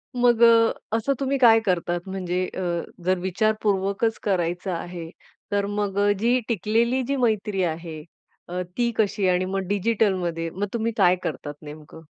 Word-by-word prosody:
मग 240 Hz, -1 st, +3 dB
अ, 230 Hz, -1 st, +6 dB, 0.3 s
असं 250 Hz, +5 st, 0 dB
तुम्ही 275 Hz, 0 st, 0 dB
काय 230 Hz, -4 st, +6 dB
करतात, 175 Hz, -2 st, 0 dB
म्हणजे 185 Hz, -1 st, -2 dB
अ, -, -, -2 dB, 0.4 s
जर 185 Hz, 0 st, +2 dB
विचारपूर्वकच 200 Hz, +2 st, 0 dB
करायचं 180 Hz, -1 st, -1 dB
आहे, 170 Hz, -1 st, -6 dB, 0.4 s
तर 200 Hz, 0 st, +1 dB
मग 205 Hz, -1 st, -2 dB, 0.2 s
जी 240 Hz, +4 st, +3 dB
टिकलेली 230 Hz, +4 st, +1 dB
जी 280 Hz, -, 0 dB
मैत्री 215 Hz, -6 st, 0 dB
आहे 160 Hz, -2 st, -4 dB, 0.4 s
अ, 180 Hz, +1 st, -3 dB, 0.2 s
ती 240 Hz, -1 st, +1 dB
कशी 205 Hz, -2 st, +1 dB
आणि 180 Hz, 0 st, +2 dB
मग 195 Hz, +1 st, -2 dB
डिजिटल 205 Hz, +1 st, +1 dB
मध्ये 165 Hz, -2 st, -3 dB
मग 195 Hz, +5 st, -3 dB
तुम्ही 230 Hz, 0 st, 0 dB
काय 180 Hz, -3 st, +5 dB
करतात 145 Hz, 0 st, -4 dB
नेमकं? 150 Hz, +1 st, -11 dB
200 Hz, 155 wpm, -24 LUFS, 180-225 Hz, 0.4 s, अ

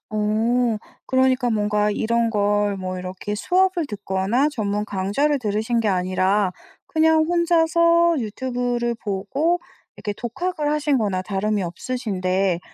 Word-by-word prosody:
어 220 Hz, +2 st, +1 dB, 0.3 s
그러니까 260 Hz, -1 st, +2 dB
뭔가 210 Hz, -1 st, +1 dB
이런 230 Hz, +2 st, +1 dB
걸 205 Hz, -1 st, +1 dB
뭐 185 Hz, -1 st, -4 dB
이렇게 185 Hz, +3 st, -5 dB
수업을 365 Hz, -, +1 dB
듣거나 205 Hz, +6 st, 0 dB
전문 210 Hz, -5 st, -2 dB
강좌를 205 Hz, +10 st, 0 dB
들으신 220 Hz, +1 st, 0 dB
게 220 Hz, -, 0 dB
아니라 185 Hz, +1 st, +1 dB, 0.3 s
그냥 315 Hz, 0 st, +3 dB
혼자서 335 Hz, 0 st, +3 dB
유튜브를 245 Hz, +1 st, -2 dB
보고 265 Hz, -, 0 dB, 0.4 s
이렇게 205 Hz, -, -4 dB
독학을 300 Hz, +5 st, -2 dB
하신 295 Hz, -3 st, +1 dB
거나 195 Hz, -4 st, -1 dB
다름이 205 Hz, +1 st, -1 dB
없으신데 185 Hz, -2 st, -1 dB
220 Hz, 285 characters per minute, -22 LUFS, 200-280 Hz, 0.4 s, 그냥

